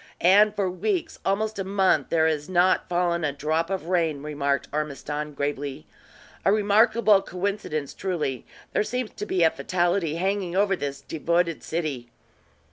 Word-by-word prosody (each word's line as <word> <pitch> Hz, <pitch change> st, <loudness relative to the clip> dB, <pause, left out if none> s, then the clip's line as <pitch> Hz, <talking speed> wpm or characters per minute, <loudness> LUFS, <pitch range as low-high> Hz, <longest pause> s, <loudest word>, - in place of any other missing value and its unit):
"And 205 Hz, +3 st, +6 dB
for 200 Hz, -2 st, 0 dB
weeks, 335 Hz, -, -2 dB
almost 210 Hz, 0 st, -1 dB
month, 190 Hz, -7 st, +2 dB
there 160 Hz, -1 st, +3 dB
has 155 Hz, 0 st, -2 dB
not 185 Hz, 0 st, +2 dB
fallen 175 Hz, -1 st, 0 dB
a 145 Hz, -, +1 dB
drop 155 Hz, +4 st, -1 dB
of 190 Hz, -4 st, -3 dB
rain," 165 Hz, -5 st, 0 dB
remarked 140 Hz, -2 st, -1 dB
Ormiston, 150 Hz, 0 st, -3 dB
gravely. 145 Hz, 0 st, -3 dB, 0.6 s
"A -, -, +4 dB
remarkable 215 Hz, 0 st, +4 dB
coincidence, 180 Hz, -7 st, -3 dB
truly. 160 Hz, -9 st, -3 dB, 0.3 s
There -, -, +2 dB
seems 240 Hz, +2 st, -3 dB
to 210 Hz, -, -6 dB
be 185 Hz, -4 st, +1 dB
a 160 Hz, -, +5 dB
fatality 175 Hz, -2 st, 0 dB
hanging 190 Hz, 0 st, -1 dB
over 195 Hz, 0 st, +3 dB
this 140 Hz, -5 st, -5 dB
devoted 170 Hz, +1 st, 0 dB
city." 150 Hz, -8 st, -3 dB
175 Hz, 145 wpm, -25 LUFS, 150-195 Hz, 0.6 s, And